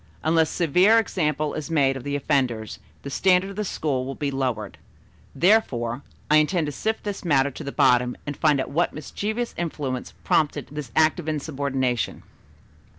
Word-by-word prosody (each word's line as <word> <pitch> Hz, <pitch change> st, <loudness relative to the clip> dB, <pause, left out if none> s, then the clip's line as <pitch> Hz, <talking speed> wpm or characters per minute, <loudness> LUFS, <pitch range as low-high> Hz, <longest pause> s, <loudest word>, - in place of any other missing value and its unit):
Unless 160 Hz, -1 st, +3 dB
a -, -, -6 dB
severe 180 Hz, +7 st, +4 dB
example 155 Hz, -8 st, 0 dB
is 155 Hz, +1 st, -5 dB
made 140 Hz, -4 st, +2 dB
of 135 Hz, -, -7 dB
the 145 Hz, +1 st, -2 dB
offenders, 130 Hz, -6 st, -1 dB, 0.2 s
the 140 Hz, -, -6 dB
standard 190 Hz, +4 st, +3 dB
of -, -, -10 dB
the 210 Hz, -, -2 dB
school 145 Hz, -9 st, -2 dB
will 135 Hz, +1 st, -5 dB
be 145 Hz, -2 st, -2 dB
lowered. 125 Hz, -6 st, -3 dB, 0.6 s
Therefore, 135 Hz, -, +2 dB, 0.3 s
I 150 Hz, -, +5 dB
intend 155 Hz, +2 st, +2 dB
to 145 Hz, -, -3 dB
sift 220 Hz, +10 st, -2 dB
this 205 Hz, -1 st, -4 dB
matter 140 Hz, -5 st, +2 dB
to 145 Hz, -, -8 dB
the 140 Hz, -, -5 dB
bottom 125 Hz, -1 st, +3 dB
and 145 Hz, -, -4 dB
find 150 Hz, -2 st, +2 dB
out 130 Hz, -, -3 dB
what 170 Hz, +5 st, +1 dB
mischievous 215 Hz, +9 st, -3 dB
influence 145 Hz, -7 st, -4 dB
prompted 155 Hz, -2 st, +1 dB
this 150 Hz, -5 st, -6 dB
act 160 Hz, +2 st, +4 dB
of 160 Hz, -2 st, -4 dB
insubordination. 135 Hz, -5 st, -2 dB
150 Hz, 175 wpm, -24 LUFS, 135-170 Hz, 0.6 s, I